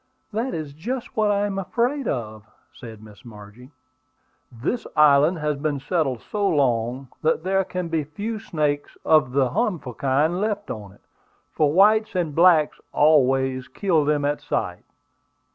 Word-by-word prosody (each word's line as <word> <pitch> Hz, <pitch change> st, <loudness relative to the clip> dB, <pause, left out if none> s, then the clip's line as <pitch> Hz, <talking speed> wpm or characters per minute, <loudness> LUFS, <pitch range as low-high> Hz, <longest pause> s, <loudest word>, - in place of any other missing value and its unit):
"That 235 Hz, +5 st, -2 dB
is 155 Hz, -3 st, -6 dB
just 235 Hz, -, -5 dB
what 215 Hz, -1 st, +2 dB
I 205 Hz, 0 st, +1 dB
am 195 Hz, -1 st, -3 dB
afraid 245 Hz, +8 st, -1 dB
of," 110 Hz, -3 st, -5 dB, 0.2 s
said 110 Hz, -3 st, -11 dB
Miss 105 Hz, -2 st, -15 dB
Margie. 110 Hz, +2 st, -13 dB, 0.8 s
"This 130 Hz, -, -3 dB
island 150 Hz, +3 st, +5 dB
has 150 Hz, -2 st, -2 dB
been 145 Hz, -1 st, -2 dB
settled 135 Hz, -4 st, -1 dB
so 205 Hz, -1 st, -2 dB
long 125 Hz, -2 st, 0 dB
that 160 Hz, 0 st, +1 dB
there 195 Hz, +1 st, +1 dB
can 180 Hz, -1 st, -4 dB
be 165 Hz, -2 st, -1 dB
but 145 Hz, +2 st, -20 dB
few 215 Hz, +3 st, -3 dB
snakes 150 Hz, -6 st, -2 dB
of 155 Hz, -5 st, +4 dB
the 135 Hz, -2 st, +2 dB
harmful 180 Hz, -, -2 dB
kind 145 Hz, -, 0 dB
left 205 Hz, -1 st, -2 dB
on 105 Hz, -3 st, -8 dB
it; 100 Hz, -, -24 dB, 0.5 s
for 150 Hz, -2 st, +1 dB
whites 210 Hz, +4 st, +4 dB
and 170 Hz, -5 st, -1 dB
blacks 165 Hz, -2 st, +4 dB
always 135 Hz, -3 st, +2 dB
kill 175 Hz, -7 st, +1 dB
them 145 Hz, 0 st, 0 dB
at 145 Hz, 0 st, -1 dB
sight." 95 Hz, -10 st, -3 dB
150 Hz, 160 wpm, -23 LUFS, 130-190 Hz, 0.8 s, island